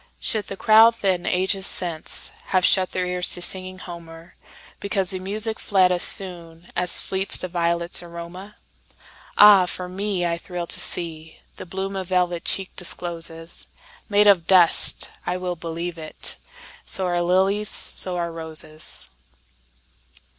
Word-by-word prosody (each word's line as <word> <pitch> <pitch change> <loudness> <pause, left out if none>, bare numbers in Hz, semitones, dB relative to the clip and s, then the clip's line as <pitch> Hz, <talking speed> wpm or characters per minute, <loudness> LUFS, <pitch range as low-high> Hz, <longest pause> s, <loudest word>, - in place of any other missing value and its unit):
Should 215 -2 0
the 195 - -7
crowd 225 +2 +6
then, 185 -3 0
ages 190 +1 +1
since, 170 -3 -2
Have 185 -1 +1
shut 185 -2 +3
their 185 - -2
ears 180 0 -1
to 175 - -5
singing 185 0 -2
Homer, 170 -2 -11 0.5
Because 195 -2 -1
the 185 - -4
music 215 +4 -3
fled 185 -2 +2
as 180 -1 +1
soonAs 175 -1 -1
fleets 190 0 -1
the 185 - -2
violets' 170 0 -1
aroma? 175 +4 -10 0.8
Ah, 205 -3 +8
for 180 0 -5
me, 190 0 -3
I 170 0 -2
thrill 175 0 -6
to - - -4
seeThe 160 +1 -3
bloom 195 +2 -4
a 190 - -3
velvet 180 -2 -1
cheek 195 -1 0
discloses, 165 -2 -5 0.4
Made 205 0 +4
of 190 -5 +4
dust—I 180 0 +3
well 180 -1 -4
believe 170 +1 -6
it! 155 -1 -1 0.5
So 190 - +4
are 175 -1 0
lilies, 190 +4 +1
so 180 -1 +2
are 170 -1 -3
roses! 160 -1 -3
180 Hz, 140 wpm, -22 LUFS, 170-190 Hz, 0.8 s, Ah